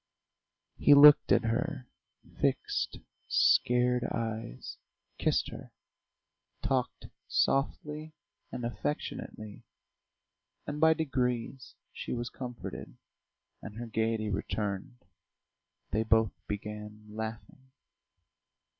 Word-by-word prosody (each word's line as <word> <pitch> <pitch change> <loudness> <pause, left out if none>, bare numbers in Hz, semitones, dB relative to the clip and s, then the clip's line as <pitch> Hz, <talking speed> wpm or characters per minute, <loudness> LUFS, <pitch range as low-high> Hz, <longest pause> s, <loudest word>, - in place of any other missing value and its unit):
He 145 - +7
looked 145 +1 +8
at - - +5
her 120 +3 -2 0.5
fixed, - - 0 0.3
scared 125 0 +3
eyes, 110 - -4 0.4
kissed - - +1
her, - - -10 0.9
talked 130 -2 -1 0.2
softly 150 +3 0 0.4
and 120 - -4
affectionately, 110 -2 -5 1.0
and 145 +1 -4
by 160 0 +6
degrees 130 -4 -2 0.2
she - - -5
was 120 0 -3
comforted, 125 - -7 0.6
and 105 - -9
her 120 +1 -5
gaiety 110 -1 -1
returned; 100 +2 -3 0.9
they 110 - +1
both 110 -2 +3
began 105 +1 -6
laughing. 110 +4 -7
120 Hz, 85 wpm, -30 LUFS, 110-130 Hz, 1.0 s, looked